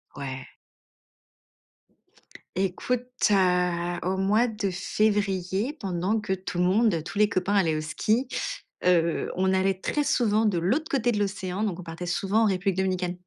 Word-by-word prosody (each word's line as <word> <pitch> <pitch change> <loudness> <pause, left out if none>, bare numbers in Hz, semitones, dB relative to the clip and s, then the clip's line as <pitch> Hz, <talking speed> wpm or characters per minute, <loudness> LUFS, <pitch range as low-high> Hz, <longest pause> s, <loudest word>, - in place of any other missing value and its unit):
Ouais. 130 -2 -6 2.1
Écoute, 215 +7 -1 0.2
heu, 180 -2 +2
au 185 +2 0
mois 210 +5 +3
de 215 -3 -2
février, 195 +3 0
pendant 195 - -1
que 210 -2 -2
tout 185 -2 -4
le - - +3
monde, 190 -4 +2
tous 175 +4 -7
les 210 - +5
copains 200 +1 0
allaient 165 -6 +3
au 155 - -2
ski, 215 - 0 0.6
heu, 170 -2 +2
on 190 +1 +1
allait 190 0 +1
très 295 - 0
souvent 220 -4 +2
de 185 -5 +2
l'autre 260 - 0
côté 245 -3 +2
de 210 - -1
l'océan, 195 -1 -2
donc 190 -5 -2
on - - -7
partait 165 +1 -7
souvent 195 +5 +1
en - - +4
République 195 -1 0
Dominicaine. 185 -1 -1
190 Hz, 160 wpm, -26 LUFS, 180-210 Hz, 2.1 s, les